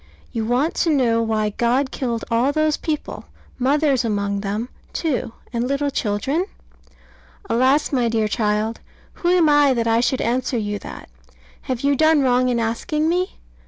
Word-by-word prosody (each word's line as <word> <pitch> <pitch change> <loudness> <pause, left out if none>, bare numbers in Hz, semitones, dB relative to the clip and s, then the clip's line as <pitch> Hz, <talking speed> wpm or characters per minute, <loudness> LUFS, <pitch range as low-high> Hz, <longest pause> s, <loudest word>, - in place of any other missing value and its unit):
You 225 -2 -2
want 260 +7 +1
to 335 - +2
know 245 -6 +2
why 220 -2 0
God 250 +5 +1
killed 235 -4 -3
all 240 +4 +2
those 310 0 +1
people 305 -2 -4 0.3
mothers 275 0 +2
among 200 -2 -1
them, 210 +4 -3 0.2
too, 260 -8 -2 0.2
and 235 +1 -1
little 280 +1 0
children? 270 - -1 1.0
Alas, 260 +5 +2
my 245 -4 +1
dear 220 -1 +1
child! 210 +1 -1 0.4
who 345 - 0
am 355 -3 +4
I 290 -3 +4
that 230 -1 0
I 230 0 +3
should 250 +2 +1
answer 250 +1 0
you 205 -2 -2
that? - - -10 0.6
Have 255 -2 -1
you 280 0 +2
done 315 +1 +4
wrong 255 0 +3
in 240 -1 +1
asking 300 +8 -1
me? 360 +2 -1
250 Hz, 160 wpm, -21 LUFS, 230-290 Hz, 1.0 s, am